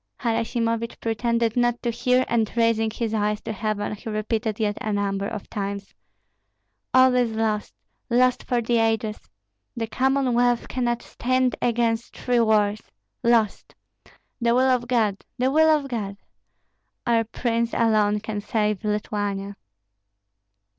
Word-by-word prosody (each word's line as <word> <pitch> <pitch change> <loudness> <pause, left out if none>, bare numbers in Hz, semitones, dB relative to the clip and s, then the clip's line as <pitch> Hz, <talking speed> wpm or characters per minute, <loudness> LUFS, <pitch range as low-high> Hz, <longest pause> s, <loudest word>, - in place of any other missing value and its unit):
Harasimovich 230 0 -1
pretended 230 0 0
not 240 -1 +2
to 240 - 0
hear, 250 +2 +2
and 225 -3 +1
raising 230 -1 +2
his 225 0 -3
eyes 210 -1 0
to - - -5
heaven 215 0 -2
he 210 +2 -7
repeated 215 0 -2
yet 210 -2 0
a 215 - -2
number 200 -1 -1
of 205 - -6
times: 200 -1 -5 1.0
"All 260 0 +6
is 245 -3 +2
lost, 220 -1 -1 0.3
lost 250 +1 +3
for 240 -1 -1
the 235 +1 +2
ages! 225 -1 -1 0.5
The 230 - -1
Commonwealth 245 -1 +1
cannot 240 -2 -1
stand 255 0 0
against 235 -1 0
three 245 -1 +1
wars. 215 -2 +2 0.4
Lost! 230 -3 +1 0.7
The 235 0 +3
will 255 - +4
of 245 -1 0
God, 220 -5 +1
the 255 +1 +1
will 315 +2 +5
of 300 -3 +2
God! 205 -6 -4 0.9
Our 230 -2 +3
prince 230 +1 -1
alone 210 -2 +2
can 215 -1 -4
save 210 -1 -1
Lithuania." 205 -1 -2
230 Hz, 135 wpm, -24 LUFS, 210-240 Hz, 1.0 s, All